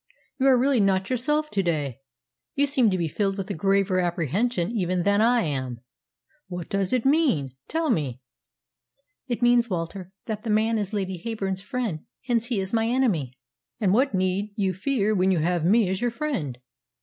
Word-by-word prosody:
You 265 - +3
are 260 -2 +6
really 265 0 +3
not 195 +1 +1
yourself 300 +5 0
to 200 - +1
day. 150 -8 -2 0.6
You 285 - +3
seem 265 -5 +3
to 185 - 0
be 170 -2 0
filled 195 +5 -1
with 195 -1 -4
a - - -1
graver 195 +1 +1
apprehension 175 - 0
even 185 -5 0
than 200 +2 +3
I 240 +1 +4
am. 130 -5 -3 0.7
What 180 -3 -6
does 195 -1 0
it 255 -2 +1
mean? 265 - +2
Tell 320 -2 0
me." 140 - -1 1.1
"It 240 -1 -2
means, 240 -1 +4
Walter, 180 +1 -4
that 215 -2 -4
that 225 - -5
man 220 +1 +2
is 205 -1 -3
Lady 190 -4 -3
Heyburn's 195 -5 -3
friend; 215 -6 -3 0.3
hence 235 -2 0
he 240 -5 0
is 190 +2 -4
my 225 0 +2
enemy." 195 - 0 0.4
"And 195 -4 +2
what 255 -1 +2
need 185 +3 -1
you 195 -3 0
fear 215 +2 0
when 190 -1 +2
you 185 - +2
have 170 +1 0
me 210 +4 +4
as 185 +1 -2
your 240 - +2
friend?" 235 - -3
200 Hz, 185 wpm, -25 LUFS, 180-240 Hz, 1.1 s, are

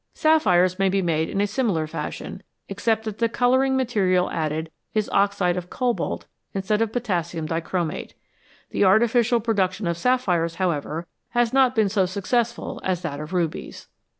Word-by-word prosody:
Sapphires 185 - +3
may 195 0 +3
be 195 0 +1
made 160 -2 0
in 200 - -1
a - - +3
similar 205 -7 0
fashion, 155 - -6 0.3
except 220 +3 0
that 215 -2 -6
the 230 0 +2
colouring 260 +3 +2
material 195 -8 +1
added 160 0 -2 0.2
is 215 -1 +1
oxide 200 -3 +2
of 180 0 -5
cobalt 245 -2 -2 0.3
in 195 - -1
stead 210 +3 +1
of 225 -1 +1
potassium 175 -9 -2
dichromate. 165 0 -3 0.6
The - - +1
artificial 235 +4 +4
production 200 -3 0
of 170 0 -1
sapphires, 180 -9 +1
however, 165 -2 -2 0.3
has 240 -1 +2
not 260 -1 +4
been 220 -2 +3
so 190 -2 +1
successful 235 +6 -2
as 185 -2 -1
that 145 -4 -4
of 150 +2 -7
rubies. 175 -4 -3
195 Hz, 160 wpm, -24 LUFS, 175-230 Hz, 0.6 s, artificial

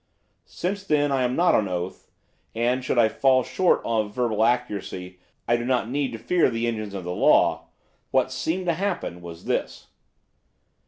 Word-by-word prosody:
Since, 200 +2 -3
then, 145 -5 +1
I 135 -1 +1
am 125 0 0
not 175 +1 +3
on 105 - +2
oath, 90 0 -5 0.5
and, 120 +3 0
should 125 - -1
I 115 -2 +6
fall 130 +3 +3
short 185 +7 +2
of 110 -2 -1
verbal 115 -4 +1
accuracy, 100 -6 -2 0.3
I 120 - +3
do 120 - -4
not 125 -2 0
need 140 -1 -1
to - - -4
fear 165 +10 +2
the 115 0 -2
engines 110 -3 -3
of 95 - -5
the 90 - -4
law, - - +3 0.4
what - - +1
seemed 180 +3 -2
to 170 - +2
happen 175 - -3
was 85 -1 -10
this. - - -3
120 Hz, 175 wpm, -24 LUFS, 105-145 Hz, 0.5 s, I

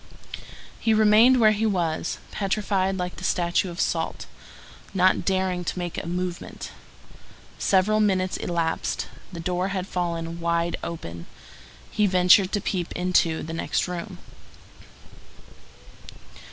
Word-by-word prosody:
He 225 -1 +2
remained 220 +4 +6
where 215 -2 +6
he 215 +1 0
was, 170 -5 -1
petrified 195 -1 0
like 180 -1 -4
the - - -9
statue 175 +1 +1
of 175 0 -8
salt, - - -1 0.7
not 185 0 +3
daring 185 -2 0
to - - -3
make 175 -1 -3
a - - -7
movement. 180 0 -4 0.9
Several 200 +3 +3
minutes 190 -3 +1
elapsed. 165 -2 -2 0.2
The 170 - -7
door 180 +2 -1
had 190 -2 -3
fallen 170 -2 -3
wide 170 0 0
open. 85 - -6 0.6
He 210 -1 +2
ventured 185 +1 +5
to 205 - +1
peep 180 -3 -2
into 175 -2 +1
the 165 - -6
next 165 - -1
room. 175 -1 -6
180 Hz, 125 wpm, -25 LUFS, 170-195 Hz, 0.9 s, remained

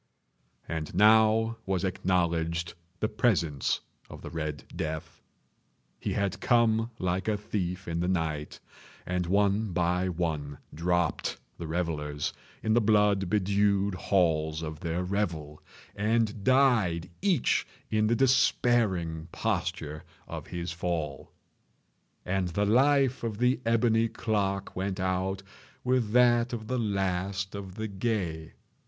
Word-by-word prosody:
And 80 -1 -4
now 110 +2 +5
was 95 -1 0
acknowledged 85 -3 0 0.3
the 110 - +2
presence 85 - +1 0.3
of - - -10
the - - -7
Red 75 -3 -4
Death. 80 0 -5 0.8
He - - -2
had 100 -2 -1
come 115 -2 +3
like 95 +1 -1
a 105 -1 +1
thief 95 -3 -3
in 85 0 -2
the 90 - 0
night. 80 -5 -2 0.5
And 90 -1 -1
one 100 +1 +2
by 90 +2 +1
one 80 -5 -2 0.2
dropped 85 +1 0 0.2
the 85 - -5
revellers 75 -3 -2 0.3
in 110 - +2
the 120 - +4
blood 105 -3 +3
bedewed 100 0 +2
halls 80 -4 +1
of 80 -1 -5
their 85 +2 -2
revel, 85 -6 -2 0.3
and 105 0 0
died 115 -11 +3
each 185 - +2 0.2
in 110 0 +2
the 115 - +3
despairing 115 -10 +2
posture 75 0 -2 0.2
of - - -7
his 85 0 -4
fall. 85 -5 -3 0.9
And 95 0 0
the 100 +4 0
life 135 +4 +3
of 110 -3 -2
the 125 +3 +2
ebony 115 0 +3
clock 100 -3 -2
went 95 +1 -2
out 95 +1 -1 0.4
with 125 -3 +1
that 120 0 +4
of 110 -2 -4
the 125 +3 -1
last 95 -2 -1
of 95 -2 -7
the 110 0 -3
gay. 95 -6 -2
95 Hz, 125 wpm, -28 LUFS, 85-110 Hz, 0.9 s, now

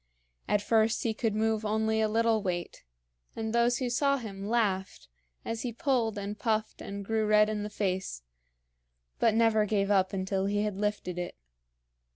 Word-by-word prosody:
At 205 0 +1
first 225 +1 +2
he 230 - 0
could 220 -1 -1
move 220 0 +1
only 220 +1 +1
a 220 - +3
little 225 0 +2
weight, 175 -3 -4 0.5
and 220 0 -3
those 235 +1 +3
who 255 - -1
saw 275 +3 +2
him 200 -4 -6
laughed 190 - -1 0.4
as 230 0 -3
he 245 - -3
pulled 230 -3 0
and 205 +1 -5
puffed 220 -2 -1
and 200 0 -6
grew 220 +1 0
red 210 0 +5
in 210 -1 -2
the 210 - -4
face, 185 - -2 1.0
but 225 -2 +3
never 225 -2 +4
gave 200 -1 +1
up 190 -1 +3
until 190 0 -1
he 205 +1 0
had 210 -2 -2
lifted 200 -3 -2
it. 175 - -5
215 Hz, 175 wpm, -29 LUFS, 200-225 Hz, 1.0 s, red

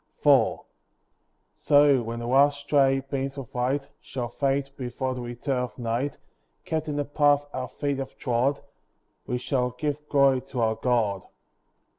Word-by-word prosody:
IV - - +4 0.9
So, 145 -3 +4
when 115 0 -5
the 120 - -5
last 140 +3 +3
stray 135 -2 +3
beams 135 0 -4
of 135 -4 -8
light 135 +3 -1
Shall 120 -3 -5
fade 140 +2 -1
before 130 +1 -3
the 125 - -5
return 120 +2 -3
of 125 0 -4
night, 120 +4 -2 0.5
Kept 155 -1 -2
in 150 - -2
the 145 0 -1
path 145 0 +3
our 130 0 -3
feet 140 +1 -3
have 135 - -6
trod, 125 +3 0 0.7
We 125 - -1
shall 125 0 0
give 150 +4 -4
glory 140 -2 +4
to 135 -2 -5
our 110 -1 +2
God. 110 -6 0
135 Hz, 155 wpm, -26 LUFS, 125-145 Hz, 0.9 s, IV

